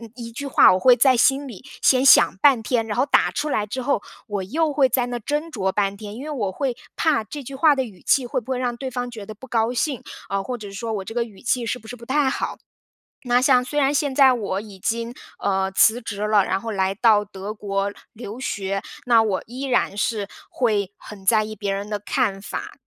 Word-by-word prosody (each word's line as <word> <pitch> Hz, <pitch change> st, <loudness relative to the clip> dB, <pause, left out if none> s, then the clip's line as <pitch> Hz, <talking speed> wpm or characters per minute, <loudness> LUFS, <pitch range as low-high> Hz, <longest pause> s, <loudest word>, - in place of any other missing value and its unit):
一 235 Hz, -2 st, -8 dB
句 280 Hz, +5 st, -6 dB
话 275 Hz, -, +6 dB
我 185 Hz, -, +1 dB
会 250 Hz, +5 st, +6 dB
在 260 Hz, -1 st, +4 dB
心 270 Hz, +3 st, +3 dB
里 235 Hz, +1 st, -11 dB, 0.2 s
先 260 Hz, 0 st, +4 dB
想 270 Hz, -, +7 dB
半 265 Hz, -6 st, +5 dB
天， 230 Hz, 0 st, 0 dB
然 210 Hz, -2 st, -4 dB
后 280 Hz, -, +3 dB
打 -, -, +3 dB
出 300 Hz, +1 st, -2 dB
来 210 Hz, -7 st, 0 dB
之 235 Hz, +5 st, -4 dB
后， 255 Hz, -4 st, 0 dB, 0.2 s
我 205 Hz, -2 st, -3 dB
又 305 Hz, -, 0 dB
会 280 Hz, -2 st, +3 dB
在 250 Hz, -2 st, +1 dB
那 245 Hz, 0 st, -4 dB
斟 295 Hz, +8 st, -3 dB
酌 190 Hz, -9 st, -1 dB
半 200 Hz, -1 st, 0 dB
天。 205 Hz, 0 st, -8 dB
因 260 Hz, -, -7 dB
为 305 Hz, -, -5 dB
我 215 Hz, -10 st, -2 dB
会 255 Hz, +3 st, -2 dB, 0.2 s
怕 300 Hz, -8 st, +1 dB
这 290 Hz, +6 st, -7 dB
句 270 Hz, +2 st, -9 dB
话 295 Hz, +2 st, +4 dB
的 265 Hz, -2 st, -1 dB
语 205 Hz, -6 st, -13 dB
气 260 Hz, -3 st, +2 dB
会 -, -, -2 dB
不 260 Hz, -, -10 dB
会 255 Hz, -, 0 dB
让 245 Hz, -1 st, -2 dB
对 260 Hz, +1 st, -5 dB
方 245 Hz, 0 st, -4 dB
觉 220 Hz, -4 st, -8 dB
得 215 Hz, +1 st, -9 dB
不 260 Hz, -, -13 dB
高 230 Hz, -2 st, 0 dB
兴， 255 Hz, +1 st, -1 dB, 0.3 s
呃， 195 Hz, 0 st, -1 dB
或 250 Hz, +3 st, -5 dB
者 205 Hz, -3 st, -8 dB
说 220 Hz, +3 st, -5 dB
我 205 Hz, -, -3 dB
这 225 Hz, -, -7 dB
个 240 Hz, -1 st, +1 dB
语 210 Hz, -5 st, -14 dB
气 245 Hz, 0 st, 0 dB
是 240 Hz, +2 st, -2 dB
不 220 Hz, -, -15 dB
是 245 Hz, -, -7 dB
不 235 Hz, -, -12 dB
太 275 Hz, +3 st, +1 dB
好。 265 Hz, -, -3 dB, 0.7 s
那 245 Hz, 0 st, +3 dB
像 255 Hz, -1 st, +4 dB
虽 295 Hz, +3 st, -1 dB
然 275 Hz, -1 st, +3 dB
现 290 Hz, -2 st, 0 dB
在 265 Hz, -1 st, +6 dB
我 200 Hz, -5 st, -2 dB
已 205 Hz, -2 st, -12 dB
经， 230 Hz, +5 st, -3 dB, 0.2 s
呃， 190 Hz, -1 st, 0 dB
辞 220 Hz, +4 st, +4 dB
职 205 Hz, -1 st, -4 dB
了， 210 Hz, -2 st, +4 dB
然 190 Hz, -, -1 dB
后 230 Hz, -, -4 dB
来 190 Hz, -2 st, 0 dB
到 210 Hz, 0 st, +3 dB
德 200 Hz, +1 st, -7 dB
国 200 Hz, -1 st, -2 dB, 0.2 s
留 230 Hz, 0 st, -8 dB
学， 195 Hz, -5 st, -3 dB, 0.2 s
那 230 Hz, -2 st, +5 dB
我 200 Hz, -4 st, -1 dB
依 250 Hz, +4 st, -7 dB
然 245 Hz, -6 st, 0 dB
是 210 Hz, -1 st, -1 dB, 0.2 s
会 210 Hz, -6 st, 0 dB
很 195 Hz, -2 st, -12 dB
在 215 Hz, +2 st, +4 dB
意 215 Hz, 0 st, -7 dB
别 200 Hz, -1 st, -2 dB
人 200 Hz, +1 st, -4 dB
的 210 Hz, -, -1 dB
看 205 Hz, 0 st, -1 dB
法。 -, -, -6 dB
230 Hz, 260 characters per minute, -22 LUFS, 205-260 Hz, 0.7 s, 想